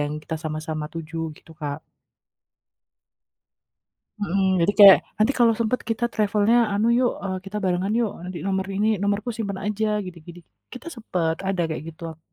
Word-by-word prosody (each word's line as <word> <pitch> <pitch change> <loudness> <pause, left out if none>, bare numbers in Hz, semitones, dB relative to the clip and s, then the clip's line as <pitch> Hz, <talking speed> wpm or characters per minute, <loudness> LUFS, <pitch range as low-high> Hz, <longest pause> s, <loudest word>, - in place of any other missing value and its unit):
yang 145 0 -1
kita 160 - -4
sama-sama 155 0 -3
tuju, 165 0 -7 0.2
gitu - - -19
Kak. 145 0 -4 2.4
Mhm. 195 -1 0 0.2
Jadi 170 +4 +3
kayak, 200 -2 +11 0.2
nanti 215 +5 +3
kalau 235 -2 +5
sempat 230 +2 0
kita 225 +1 -1
travel-nya 210 +1 +2 0.2
anu 205 +2 +1
yuk, 250 -1 +3
e - - -1 0.2
kita 195 +2 -6
barengan 185 +2 0
yuk. 225 -4 0
Nanti 180 0 -6
nomor 190 -1 -1
ini, 210 +2 +1 0.2
nomorku 205 +3 0
simpan 200 -4 -3
aja, 210 +1 -1 0.2
gidik 175 -3 -10
gidik. 175 0 -11 0.3
Kita 250 +3 -10
sepet, 170 -8 -1
ada 190 -2 0
kayak 155 - -4
gitu 160 - -19
ak 160 0 -24
195 Hz, 165 wpm, -24 LUFS, 165-215 Hz, 2.4 s, kayak